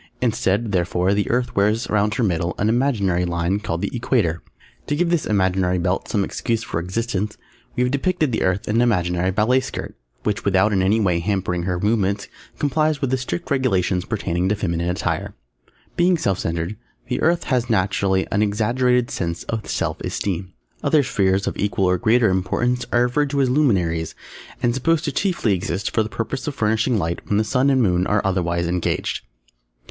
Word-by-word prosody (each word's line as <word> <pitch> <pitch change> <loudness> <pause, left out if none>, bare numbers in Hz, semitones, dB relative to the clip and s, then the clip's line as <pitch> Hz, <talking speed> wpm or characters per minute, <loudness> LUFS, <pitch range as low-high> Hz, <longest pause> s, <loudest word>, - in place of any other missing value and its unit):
Instead, 100 +3 0
therefore, 90 +1 +1
the 100 0 0
Earth 125 +1 0
wears 105 +4 +2
round 105 0 +1
her 120 - 0
middle 85 -3 0
an 105 - +1
imaginary 110 -8 +1
line 85 +3 0
called 85 -5 -3
the - - -2
Equator. 85 0 0 0.5
To 145 - 0
give 170 +2 +1
this 170 -3 +1
imaginary 95 -2 +1
belt 90 +2 -1
some 100 -3 0
excuse 115 +3 -2
for 85 - -3
existence 105 +3 -2 0.4
we 125 - +2
have 125 - +1
depicted 155 +1 0
the 110 - -1
Earth 95 +2 0
in 105 - +1
an - - +4
imaginary 90 -6 +1
ballet 110 +7 +3
skirt, - - -6 0.3
which 105 -1 -1
without 100 +2 +3
in 95 - +2
any 100 +4 +3
way 90 -5 +2
hampering 90 -2 -1
her 90 -1 -1
movements 100 -1 0 0.3
complies 155 +1 +1
with 135 -3 -1
the 130 - +2
strict 125 -9 -5
regulations 95 -9 +1
pertaining 95 -4 -1
to 105 - +2
feminine 85 -4 -1
attire. 90 - -2 0.6
Being 175 0 +3
self 100 - 0
centred, 85 +5 -3 0.3
the - - -2
Earth 170 +1 +2
has 125 -3 0
naturally 95 -2 +1
an 100 - +2
exaggerated 120 +4 +1
sense 85 -1 -3
of 110 -2 -4
self - - -2
esteem. 95 -1 -3 0.3
Other 150 -2 +4
Spheres 95 -4 +1
of - - -2
equal 100 -1 +1
or 90 0 +2
greater 115 0 +4
importance 120 +7 0
are 120 - +4
referred 140 +4 +1
to 140 0 +1
as 130 -2 +2
"Luminaries" 90 - +1 0.5
and 120 -1 +3
supposed 160 +5 +1
to - - -1
exist - - -1
chiefly 125 - +1 0.3
for - - +3
the 110 - -2
purpose 115 +6 -4
of 145 - -3
furnishing 110 +2 +1
light 85 -2 -2
when 100 - +1
the 110 - +3
Sun 125 +5 +2
and 130 -2 +3
Moon 90 -2 +2
are 105 0 +1
otherwise 85 -2 0
engaged. 90 +1 -2
105 Hz, 190 wpm, -21 LUFS, 90-125 Hz, 0.6 s, an